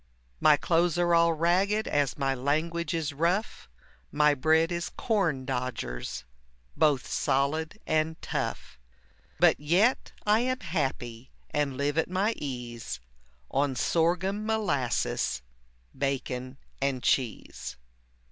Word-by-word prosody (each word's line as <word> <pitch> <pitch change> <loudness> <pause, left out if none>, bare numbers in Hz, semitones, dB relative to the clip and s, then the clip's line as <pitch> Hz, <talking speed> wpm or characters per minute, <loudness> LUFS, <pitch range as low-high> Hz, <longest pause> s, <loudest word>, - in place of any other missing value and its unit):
My 150 -1 +6
clothes 170 +2 +2
are 175 -1 +3
all 170 0 +5
ragged 185 +7 +2
as 145 -2 +1
my 135 -2 +1
language 155 +5 -1
is 160 -2 -2
rough, 170 - -1 0.4
My 150 0 +4
bread 160 +4 +3
is 170 0 -2
corn 175 - 0
dodgers, 125 - -4 0.5
both 145 -4 +3
solid 155 +6 0
and 155 +1 0
tough; - - -4 0.6
But - - +5
yet 180 - +2
I 210 +1 +4
am 255 +2 -1
happy, 130 -7 -3 0.2
and 145 -3 0
live 145 +2 +1
at 160 - 0
my 195 +5 +1
ease 120 - -5 0.5
On 135 0 +1
sorghum 180 +8 +1
molasses, 130 - 0 0.5
bacon, 130 -1 -3 0.2
and 135 -2 0
cheese. 125 - -1
150 Hz, 115 wpm, -28 LUFS, 135-175 Hz, 0.6 s, My